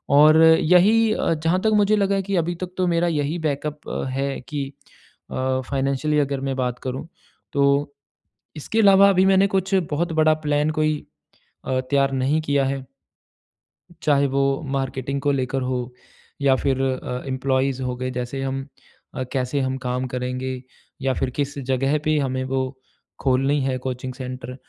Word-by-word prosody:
और 155 Hz, +2 st, +7 dB, 0.2 s
यही 210 Hz, +7 st, +5 dB
अ, 165 Hz, -, 0 dB
जहाँ 165 Hz, +3 st, 0 dB
तक 220 Hz, -, +2 dB
मुझे 205 Hz, 0 st, +4 dB
लगा 200 Hz, -1 st, +2 dB
है 195 Hz, -, +1 dB
कि 200 Hz, +1 st, -2 dB
अभी 170 Hz, +1 st, 0 dB
तक 180 Hz, 0 st, -6 dB
तो 185 Hz, -1 st, +1 dB
मेरा 170 Hz, 0 st, +2 dB
यही 155 Hz, 0 st, -1 dB
बैकअप 150 Hz, -1 st, -3 dB, 0.2 s
है 135 Hz, +1 st, -2 dB
कि 145 Hz, -3 st, -3 dB, 0.6 s
अ, 130 Hz, 0 st, -1 dB
फ़ाइनेंशियली 140 Hz, +2 st, 0 dB
अगर 140 Hz, -2 st, -1 dB
मैं 135 Hz, -1 st, -2 dB
बात 125 Hz, -2 st, -2 dB
करूँ 130 Hz, +4 st, -4 dB, 0.5 s
तो 140 Hz, +1 st, +2 dB, 0.7 s
इसके 220 Hz, +9 st, -2 dB
अलावा 200 Hz, -2 st, +7 dB
अभी 190 Hz, -1 st, +4 dB
मैंने 195 Hz, 0 st, +5 dB
कुछ 190 Hz, 0 st, -1 dB, 0.2 s
बहुत 165 Hz, +4 st, -1 dB
बड़ा 155 Hz, 0 st, +5 dB
प्लान 145 Hz, +1 st, +2 dB
कोई 155 Hz, 0 st, +2 dB, 0.7 s
अ, 130 Hz, -1 st, 0 dB
तैयार 135 Hz, +1 st, +1 dB
नहीं 135 Hz, +4 st, +1 dB
किया 140 Hz, -2 st, +1 dB
है। 135 Hz, 0 st, -3 dB, 1.2 s
चाहे 140 Hz, -1 st, +3 dB
वो 135 Hz, +1 st, +1 dB, 0.3 s
मार्केटिंग 135 Hz, +1 st, -3 dB
को 145 Hz, 0 st, +2 dB
लेकर 135 Hz, -1 st, -1 dB
हो 125 Hz, 0 st, -1 dB, 0.6 s
या 135 Hz, -1 st, +4 dB
फिर 135 Hz, 0 st, 0 dB
अ, 130 Hz, -1 st, -2 dB
एम्प्लॉइज़ 130 Hz, 0 st, 0 dB
हो 125 Hz, -1 st, -2 dB
गए 130 Hz, +1 st, -4 dB
जैसे 125 Hz, +2 st, -4 dB
हम 135 Hz, +1 st, -3 dB, 0.5 s
अ, 130 Hz, -, -2 dB
कैसे 130 Hz, +1 st, -1 dB
हम 130 Hz, 0 st, -1 dB
काम 125 Hz, +1 st, -1 dB
करेंगे 125 Hz, +1 st, -3 dB, 0.4 s
या 135 Hz, -1 st, +1 dB
फिर 130 Hz, -, -1 dB
किस 145 Hz, 0 st, -2 dB
ज़गह 135 Hz, +2 st, 0 dB
पे 155 Hz, 0 st, +2 dB
हमें 130 Hz, -2 st, -1 dB
वो 135 Hz, -, +2 dB, 0.6 s
खोलनी 135 Hz, +2 st, +2 dB
है 130 Hz, -1 st, -1 dB
कोचिंग 130 Hz, 0 st, -4 dB
सेंटर 125 Hz, -1 st, -7 dB
140 Hz, 165 wpm, -22 LUFS, 130-155 Hz, 1.2 s, और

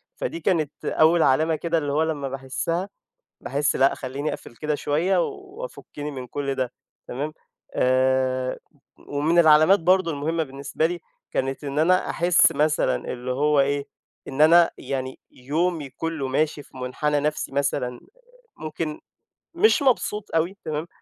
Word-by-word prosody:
فدي -, -, -4 dB
كانت 160 Hz, -, +1 dB
أوّل 160 Hz, +1 st, +4 dB
علامة 155 Hz, +4 st, +3 dB
كده، 170 Hz, +2 st, -1 dB
اللي 145 Hz, -3 st, -1 dB
هو 150 Hz, +3 st, +2 dB
لمَّا 145 Hz, -4 st, -2 dB
باحسّها، 135 Hz, +8 st, -3 dB, 0.5 s
باحس 145 Hz, +1 st, 0 dB
لأ، 135 Hz, +1 st, +4 dB
خلِّيني 140 Hz, +3 st, -4 dB
أقفل 120 Hz, -, -9 dB
كده 150 Hz, +2 st, -2 dB
شوية، 165 Hz, +6 st, +1 dB
وافُكِّني 390 Hz, -, -8 dB
من 130 Hz, -3 st, -7 dB
كل 140 Hz, +2 st, -3 dB
ده، 130 Hz, -2 st, -2 dB, 0.4 s
تمام. 145 Hz, +5 st, -4 dB, 0.4 s
آآ، 130 Hz, 0 st, +1 dB, 0.5 s
ومن 150 Hz, +4 st, +1 dB
العلامات 160 Hz, +4 st, +6 dB
برضه 185 Hz, +1 st, +3 dB
المهمة 160 Hz, +2 st, -1 dB
بالنسبة 140 Hz, +2 st, -2 dB
لي، 175 Hz, +1 st, -4 dB, 0.3 s
كانت 135 Hz, +2 st, -2 dB
إن 140 Hz, +1 st, -3 dB
أنا 180 Hz, +4 st, +3 dB
أحس 175 Hz, +1 st, +4 dB
مثلًا، 155 Hz, +1 st, +1 dB
اللي 125 Hz, 0 st, -5 dB
هو 145 Hz, +2 st, +3 dB
إيه، 140 Hz, +1 st, 0 dB, 0.4 s
إن 135 Hz, +2 st, -5 dB
أنا 170 Hz, +2 st, +7 dB
يعني، 130 Hz, -1 st, -4 dB
يومي 155 Hz, +3 st, -2 dB
كلّه 160 Hz, -2 st, -3 dB
ماشي 150 Hz, +2 st, 0 dB
في 135 Hz, -, -19 dB
منحنى 145 Hz, +4 st, -1 dB
نفسي 150 Hz, -1 st, -2 dB
مثلًا، 135 Hz, -3 st, -1 dB, 0.6 s
ممكن 155 Hz, 0 st, -4 dB, 0.5 s
مش 435 Hz, -6 st, +4 dB
مبسوط 230 Hz, -6 st, +1 dB
أوي، 170 Hz, +5 st, 0 dB
تمام. 155 Hz, +1 st, -3 dB
150 Hz, 145 wpm, -24 LUFS, 135-165 Hz, 0.6 s, أنا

